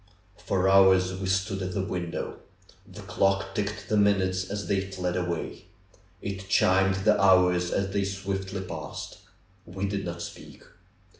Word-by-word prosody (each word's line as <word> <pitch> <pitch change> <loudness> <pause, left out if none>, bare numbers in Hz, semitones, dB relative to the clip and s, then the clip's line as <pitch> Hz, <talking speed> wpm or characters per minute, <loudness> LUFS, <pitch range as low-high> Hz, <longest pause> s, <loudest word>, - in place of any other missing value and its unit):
For 95 -1 0
hours 95 -1 +5
we 95 0 -4
stood 95 +1 0
at 95 -1 -4
the 100 - 0
window. 90 -3 -4 0.5
The - - -10
clock 95 0 0
ticked 105 -1 -3
the 105 - +1
minutes 95 -2 +2
as 100 0 -4
they 100 -1 +1
fled 90 -2 -3
away. 90 -2 -3 0.6
It 95 -1 -5
chimed 95 -1 +3
the 105 -2 +4
hours 90 -2 +4
as 100 +1 -1
they 100 -1 0
swiftly 95 0 -4
passed. 95 - -7 0.4
We 95 +2 -4
did 100 0 -2
not 85 -1 -5
speak. 85 - -10
95 Hz, 150 wpm, -27 LUFS, 90-100 Hz, 0.6 s, hours